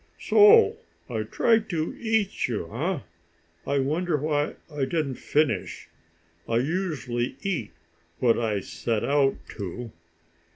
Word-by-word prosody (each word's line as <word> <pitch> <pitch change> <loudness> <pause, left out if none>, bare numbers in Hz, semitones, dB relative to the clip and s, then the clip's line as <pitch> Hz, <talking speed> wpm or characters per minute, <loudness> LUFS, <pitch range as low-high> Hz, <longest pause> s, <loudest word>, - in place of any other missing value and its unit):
So 440 +1 +6 0.3
I - - -1
tried 225 -2 +2
to 160 -3 -2
eat 220 -3 0
you, 105 -6 -4
eh? 160 +4 -1 0.7
I 140 - +1
wonder 155 +5 0
why 150 0 -1 0.2
I 145 -2 0
didn't 140 -2 -2
finish. 150 0 -1 0.6
I 115 - +2
usually 135 -5 -2
eat 175 - -2 0.5
what 120 +2 +3
I 110 -4 0
set 115 +2 -2
out 140 -1 +3 0.2
to." 110 +4 -6
145 Hz, 120 wpm, -26 LUFS, 120-180 Hz, 0.7 s, So